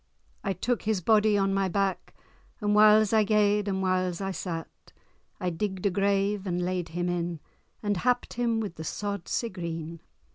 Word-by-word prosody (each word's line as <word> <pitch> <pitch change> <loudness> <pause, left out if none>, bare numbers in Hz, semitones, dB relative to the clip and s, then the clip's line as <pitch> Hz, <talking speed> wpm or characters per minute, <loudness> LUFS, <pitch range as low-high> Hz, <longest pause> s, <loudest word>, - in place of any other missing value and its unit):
I 195 - 0
took 240 +5 -1
his 215 -2 0
body 210 +3 +3
on 195 0 +1
my 195 0 +1
back, 195 0 -1 0.4
And 210 -2 +1
whiles 215 0 +6
I 220 -1 +5
gaed, 210 -1 +2
and 190 -1 -1
whiles 185 -2 0
I 195 -1 -2
sat; 170 -3 -6 0.5
I 180 -2 -1
digg'd 190 +2 -3
a 200 - +3
grave, 200 +1 +1
and 175 -1 -1
laid 180 -1 -2
him 175 +2 -2
in, 175 -2 -2 0.4
And 205 -2 0
happ'd 245 +5 0
him 235 -1 0
with 205 -5 -4
the 160 - -6
sod 200 +2 -4
sae 235 - -1
green. 165 -3 -6
195 Hz, 180 wpm, -28 LUFS, 180-210 Hz, 0.5 s, whiles